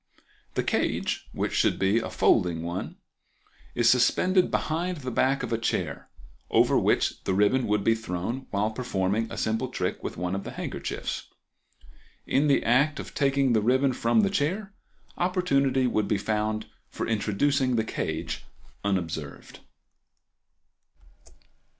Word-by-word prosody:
The - - +1
cage, - - -1
which - - -2
should - - +2
be 95 +4 +2
a 110 - -4
folding 85 -2 +2
one, 85 +2 -4 0.8
is 120 -1 +3
suspended 180 +10 +4
behind 175 +3 -1
the 130 -3 -5
back 135 +3 +1
of 115 - -3
a 115 - 0
chair, 115 - -2 0.4
over - - +4
which - - +1
the 95 - +1
ribbon 105 +6 +3
would 105 -1 +1
be 115 - +4
thrown 110 +4 -4
while 105 +2 0
performing 110 -2 -1
a - - -6
simple 110 +4 0
trick 90 -7 -3
with - - -5
one 90 +1 -2
of 95 0 -3
the - - -7
handkerchiefs. - - -4 1.0
In 140 +3 +2
the 140 - +3
act 140 +5 +3
of - - -8
taking 135 -2 +2
the 110 - +3
ribbon 130 +4 +2
from 120 - +2
the 200 -2 +1
chair 195 +4 -1 0.5
opportunity 140 -8 +2
would 110 -4 +1
be 105 - +1
found 110 +1 -1 0.2
for - - -4
introducing 125 +5 +1
the 110 - +2
cage - - -3 0.4
unobserved. 80 -7 -3
115 Hz, 145 wpm, -27 LUFS, 105-140 Hz, 1.0 s, suspended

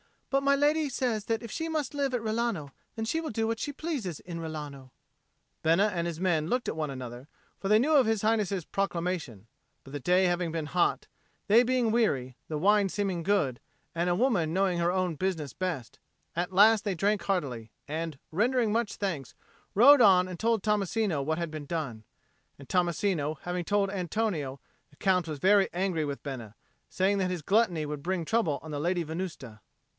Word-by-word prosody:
"But 275 0 +3
my 280 0 +3
lady 295 +2 +2
says 240 -5 -1
that 225 +1 -1
if 230 - -7
she 325 0 -3
must 310 -4 -2
live 280 -2 -1
at 245 - 0
Rilano, 220 -9 -2 0.2
then 225 - -3
she 320 +8 0
will 320 - -4
do 225 0 -1
what 225 0 -1
she 290 - -3
pleases 270 - -4
in 170 -2 -7
Rilano." 150 -5 -7 0.7
Bena 170 +6 +4
and 170 -1 -1
his 170 0 -5
men 160 -5 +1
looked 250 +5 -1
at - - -3
one 155 -2 -2
another, 125 -1 -7 0.3
for 195 - -3
they 210 +2 +6
knew 285 +8 +2
of 275 -4 +6
His 220 -2 +1
Highness's 205 -5 +1
proclamation, 175 - -3 0.4
but 135 - -13
the 145 - -3
day 180 +6 +3
having 175 -2 0
been 160 -2 -3
hot, 175 +2 +1 0.4
they 220 +3 +7
being 250 -2 +1
weary, 135 - 0
the 155 - -3
wine 200 +4 +4
seeming 190 -4 -2
good, 155 -11 +1 0.3
and 170 +1 0
a 175 - +2
woman 190 -8 +1
knowing 185 -2 +1
her 170 0 +2
own 185 -2 0
business 165 -6 -2
best, 170 -11 -4 0.4
at 175 +2 -2
last 210 +2 +6
they 200 -3 0
drank 200 +2 +1
heartily, 140 - -2 0.2
and, 160 0 -4
rendering 230 +5 +2
much 225 -1 0
thanks, 165 - -4 0.4
rode 265 +6 +8
on 185 -4 +6
and 180 - -7
told 225 -2 +1
Tommasino 210 -5 0
what 160 +3 -1
had 170 -2 -3
been 155 -2 -6
done. 140 -9 -4 0.5
And 140 - -13
Tommasino 170 -4 0
having 175 0 -3
told 200 0 +1
Antonio, 180 -7 -2 0.3
the 145 - -23
Count 180 0 +1
was 150 -3 -6
angry 190 -4 +2
with 140 -1 -5
Bena, 120 -6 -7 0.3
saying 195 +2 +1
that 185 -1 0
his 180 -4 -4
gluttony 195 -5 +2
would 150 -1 -5
bring 180 +1 -2
trouble 170 -8 +1
on 160 - -8
the 145 - -3
Lady 175 +3 0
Venusta. 155 - -6
180 Hz, 190 wpm, -29 LUFS, 155-215 Hz, 0.7 s, rode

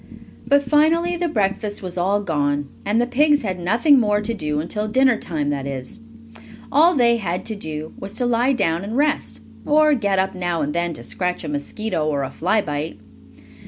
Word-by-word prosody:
But 280 0 +4
finally 320 +5 +2
the 345 0 -1
breakfast 205 -5 -1
was 180 -1 -6
all 195 +3 +1
gone, 145 -5 -1 0.2
and 210 +3 +2
the 240 - +2
pigs 290 +3 +3
had 185 -4 -3
nothing 235 - +4
more 210 -3 +2
to 210 +2 -2
do 150 -8 -2
until 210 +7 -3
dinner 260 +2 +3
time 150 -8 -2
that 140 -1 -3
is, 130 -2 -6 0.7
all 325 +5 +5
they 235 -3 +4
had 180 -5 -3
to 220 - -3
do 155 -5 -6
was 195 - -6
to 245 - -1
lie 245 +3 +2
down 165 -7 0
and 215 +5 -4
rest, 295 +1 0 0.2
or 305 0 +4
get 200 -7 0
up 190 0 +1
now 175 -4 -2
and 145 +1 -2
then 170 0 -1
to 120 - -9
scratch 180 +8 -3
a - - -5
mosquito, 155 +4 -3
or 145 -2 0
a 135 - -4
fly 190 +6 +1
bite. 145 -1 -4
205 Hz, 195 wpm, -21 LUFS, 165-250 Hz, 0.7 s, all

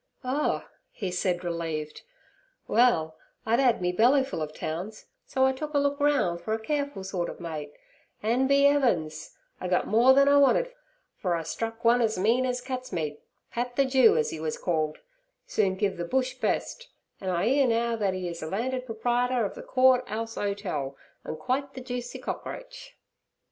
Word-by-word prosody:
'Oh' 265 +4 0 0.2
he 190 -4 -5
said, 180 0 -1
relieved. 165 -3 -4 0.7
'Well, 165 -10 +3 0.3
I'd 230 +2 +2
'ad 245 -7 +3
me 180 - +2
bellyfull 265 - +3
of 155 -1 -3
towns, 175 +8 -5 0.2
so 265 0 +2
I 265 - +4
took 300 +3 -6
a - - +5
look 285 0 +1
roun' 285 -13 +2
fer 195 +6 -3
a 220 - -1
careful 285 -3 -2
sort 190 -2 -3
ov - - -9
mate, 155 -4 -5 0.5
an', 240 +5 +2
be 280 +1 +4
'eavens! 170 - 0 0.2
I 185 - -4
gut 180 0 +1
more 240 +5 +5
then 275 0 +5
I 285 0 +6
wanted, 390 - +4 0.4
fer 180 -3 0
I 165 - -2
struck 225 +7 -5
one 240 +1 +5
as 220 -3 +1
mean 230 +7 +2
as 250 0 -2
cats' 255 0 -5
meat. 150 -3 -3 0.3
Pat 245 +1 -3
the 275 - +3
Jew, 260 -7 +5
as 155 - 0
'e 160 - -5
was 155 0 -3
called, 155 -3 -1 0.5
soon 195 -3 +1
giv' 195 -1 -1
ther 175 - -3
bush 260 +4 0
best, 485 - -2 0.3
an' 190 - -4
I 175 +1 +1
'ear 270 +1 +4
now 235 0 +1
that 200 -4 0
'e 185 -1 -3
is 170 -1 -6
landed 250 +10 -2
proprietor 245 +1 0
ov 200 - -4
the - - -9
Court 255 -1 +4
'Ouse 225 +1 -4
Hotel, 180 -11 -3 0.3
and 155 - -5
quite 270 - -2
the 260 - -6
juicy 245 -1 -5
cockroach.' - - -7
225 Hz, 185 wpm, -27 LUFS, 180-260 Hz, 0.7 s, I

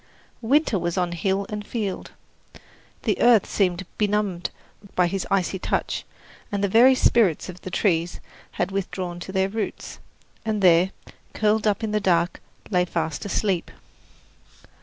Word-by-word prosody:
Winter 250 -3 +2
was 170 +1 -2
on 180 -1 0
hill 190 +3 -1
and 210 -1 -4
field. 205 -3 -4 0.9
The - - 0
earth 235 -3 +6
seemed 185 -2 0
benumbed 205 -4 0 0.5
by 180 - +4
his 185 +2 -2
icy 190 -1 0
touch, - - -2 0.5
and 205 -1 -1
the - - +3
very 240 +6 +6
spirits 205 -10 +3
of 180 0 -9
the - - -6
trees 175 -2 0 0.3
had 175 +2 -1
withdrawn 185 -2 -3
to 185 - -7
their 190 0 +1
roots, 210 +2 -5 0.4
and 215 -2 -1
there, 175 +1 +6 0.5
curled 215 0 +2
up 210 +2 +1
in 220 - -1
the 210 - +1
dark, 175 -3 +1 0.3
lay 180 -2 +3
fast 160 -2 -3
asleep. 195 -3 0
195 Hz, 145 wpm, -24 LUFS, 175-210 Hz, 0.9 s, earth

